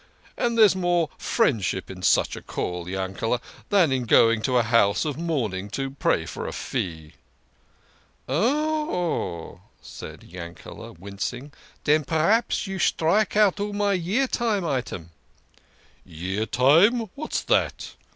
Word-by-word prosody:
And 235 -1 0
there's 215 -4 +6
more 175 -3 +1
friendship 105 - 0
in 90 -1 -9
such - - +2
a - - -8
call, 90 -1 -4
Yankele, 95 +5 -2 0.3
than 185 -8 +4
in 130 -2 0
going 115 0 +5
to 125 +2 +1
a 120 - +4
house 115 +1 +3
of 150 -3 -2
mourning 115 - -2
to 135 -1 -3
pray 110 -11 0
for 75 - -6
a - - -4
fee." 80 -3 -4 0.6
" - - -36
Oh," 205 - -1 0.2
said - - -10
Yankele, 85 -2 -10
wincing. 100 - -6 0.2
" - - -31
Den 150 +1 +3
p'raps 165 - +1
you 195 -1 -5
strike 190 +6 +2
out 205 -2 +4
all 205 0 -2
my 205 0 +1
Year 195 +9 +1
Time 220 -7 0
item! 125 - -3 0.3
" - - -33 0.2
" - - -34
Year 95 +7 -4
Time! 165 - +5
What's 305 +2 -3
that - - 0
145 Hz, 145 wpm, -24 LUFS, -, 0.6 s, there's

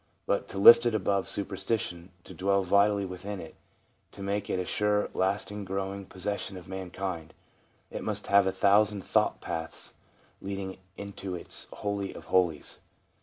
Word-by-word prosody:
But 100 - 0
to - - -7
lift 115 +4 +9
it 115 - +1
above 100 -1 0
superstition, 95 -3 -2
to - - -11
dwell 100 +1 +1
vitally 100 +2 +3
within 95 +2 -6
it, 80 - -9 0.6
to 100 - -8
make 100 +1 -2
it - - 0
a 90 - -2
sure, 105 +2 +2
lasting, 100 +2 -1
growing 95 0 -4
possession 95 0 -4
of 90 - -11
mankind, 95 -3 -5 0.6
it - - -5
must - - -1
have 100 -1 +5
a - - +2
thousand 100 +1 +3
thought - - +2
paths 80 -1 -4 0.5
leading 95 -1 -4 0.2
into 100 -2 -6
its 85 - -2
holy 100 -1 -3
of - - -10
holies. 85 -5 +1
100 Hz, 155 wpm, -29 LUFS, 95-100 Hz, 0.6 s, lift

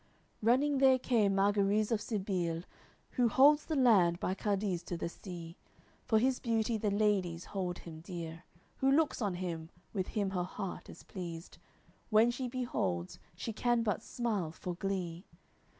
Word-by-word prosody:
LXXVII - - -6
Running 275 +4 +4
there 265 -1 +6
came 220 -6 +2
Margariz 205 +2 +2
of 220 -2 +1
Sibile, 185 -6 -2 0.5
Who 245 -3 +2
holds 290 +6 +5
the 315 - -1
land 195 -10 +5
by 185 - -1
Cadiz, 195 -2 -1
to 175 - -4
the 170 - -3
sea. 170 -2 -9 0.5
For 220 - +3
his 255 +3 +2
beauty 230 -1 0
the 210 - +1
ladies 200 -5 +1
hold 180 -3 -3
him 160 -2 -10
dear; 165 -1 -7 0.3
Who 265 - +2
looks 285 -1 +2
on 200 -4 0
him, 170 -3 -4 0.2
with 190 -3 -1
him 200 -3 -1
her 185 -2 -1
heart 185 +1 -5
is - - -11
pleased, 170 -3 -7 0.5
When 225 +2 +5
she 250 +1 -3
beholds, 165 - -2 0.2
she 220 +5 -4
can 240 +1 +1
but 210 -4 0
smile 210 -9 -2
for 175 +2 -5
glee. 180 -1 -3
200 Hz, 165 wpm, -33 LUFS, 175-235 Hz, 0.5 s, there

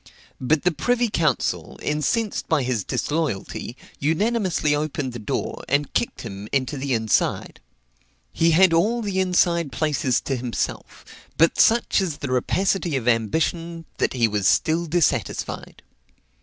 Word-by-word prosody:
But 145 +4 +1
the 180 - +3
privy 245 +7 0
council, 155 - -1
incensed 195 - -1
by 155 -5 +2
his 125 -5 -1
disloyalty, 145 - -3 0.2
unanimously 180 0 +1
opened 145 -3 -2
the 120 - -6
door, 105 - -3
and 140 0 0
kicked 235 - -1
him 100 -2 -7
into 135 +1 0
the 135 -2 -1
inside. 110 -2 0 0.7
He 165 - +3
had 170 +2 +5
all 225 +8 +2
the 195 -2 -1
inside 175 -4 +2
places 145 -5 0
to 135 - -2
himself; 120 -1 -4 0.3
but 165 +1 +3
such 230 -2 +4
is 170 -6 -2
the 140 - -5
rapacity 175 +5 0
of 125 -3 -2
ambition, 165 - 0
that - - 0
he 120 -3 +2
was 105 -3 0
still 165 +2 +2
dissatisfied. 170 0 -1
155 Hz, 140 wpm, -23 LUFS, 130-175 Hz, 0.7 s, had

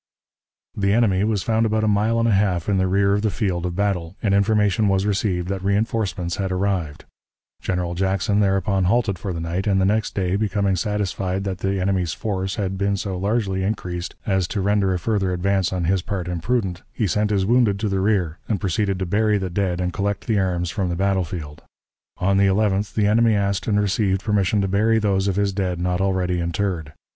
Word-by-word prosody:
The 100 -1 +1
enemy 105 -4 +3
was 105 -3 0
found 115 0 +1
about 110 0 0
a - - +2
mile 105 +2 +2
and 115 0 +2
a - - +3
half 95 -4 +1
in 100 -2 +2
the 95 - +2
rear 100 +1 +2
of 105 - +1
the 110 - +1
field 90 -4 -1
of 85 - -5
battle, 95 -3 -1
and 100 -3 +2
information 105 0 +2
was 95 0 +1
received 95 -3 0
that 95 -1 -2
reënforcements 100 -3 -1
had 95 -1 -2
arrived. 90 -5 -2 0.6
General 90 -1 -2
Jackson 95 +3 0
thereupon 95 -1 +1
halted 100 -2 +1
for 95 - -4
the 85 - -4
night, 85 +5 -3
and 95 -1 +3
the 95 - +3
next 105 +2 0
day, 95 -1 0
becoming 100 -2 0
satisfied 95 -1 -2
that 95 -2 -4
the 95 0 -1
enemy's 90 -4 0
force 95 -2 -3
had 95 -2 -3
been 100 0 +1
so 95 -1 -3
largely 100 0 -1
increased 90 -3 -3
as 95 -3 +1
to 100 - -3
render 100 0 +2
a 90 - +1
further 95 0 0
advance 95 +1 0
on 90 -2 -2
his 95 +2 +1
part 95 -1 -4
imprudent, 90 +1 -1
he 110 - -1
sent 105 +3 +1
his 100 -2 +1
wounded 115 -2 +3
to 110 - -1
the 95 -1 0
rear, 95 -5 0
and 105 -4 0
proceeded 95 +1 0
to 95 - -2
bury 105 +3 +2
the 95 -2 -3
dead 90 -1 -1
and 90 0 -2
collect 100 0 -2
the 110 -3 +1
arms 90 -2 -1
from 95 -5 -2
the 85 - -2
battlefield. 90 -5 -2 0.6
On 95 +1 +1
the 100 0 +4
11th 100 0 +1
the 105 - +2
enemy 110 +1 +4
asked 100 0 -1
and 105 -2 +2
received 100 -1 0
permission 105 -2 +1
to 95 - 0
bury 110 +4 +2
those 100 -3 +1
of 95 - 0
his 100 -1 +1
dead 95 -3 -2
not 90 +1 0
already 95 -2 0
interred. 85 -2 -2
95 Hz, 210 wpm, -22 LUFS, 90-105 Hz, 0.6 s, the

